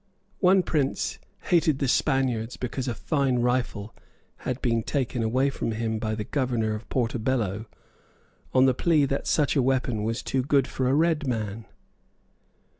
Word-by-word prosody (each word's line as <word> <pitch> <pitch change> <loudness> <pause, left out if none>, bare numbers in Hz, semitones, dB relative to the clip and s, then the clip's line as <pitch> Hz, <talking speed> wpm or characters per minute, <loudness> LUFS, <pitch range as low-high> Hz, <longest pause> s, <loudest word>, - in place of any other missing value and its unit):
One 185 0 +5
prince 145 -5 -1 0.2
hated 160 -5 +2
the 140 - -1
Spaniards 125 -4 +1
because 125 +1 -4
a 120 - -2
fine 135 +1 0
rifle 120 -3 -1 0.4
had 130 0 -4
been 115 -4 +1
taken 125 -1 -2
away 130 +5 +1
from 115 - -3
him 110 0 -2
by 110 0 -2
the 105 - -3
Governor 120 -3 -1
of 110 +2 -7
Portobello 115 -3 -1 0.8
on 130 0 +5
the 130 - +4
plea 155 +2 +3
that 140 0 -2
such 150 -1 +2
a 140 - +4
weapon 125 -3 0
was 115 +2 -2
too 130 - 0
good 140 0 +2
for 130 -1 -1
a 135 - +3
red 160 -1 +2
man. 110 -3 -3
125 Hz, 160 wpm, -26 LUFS, 115-140 Hz, 0.8 s, One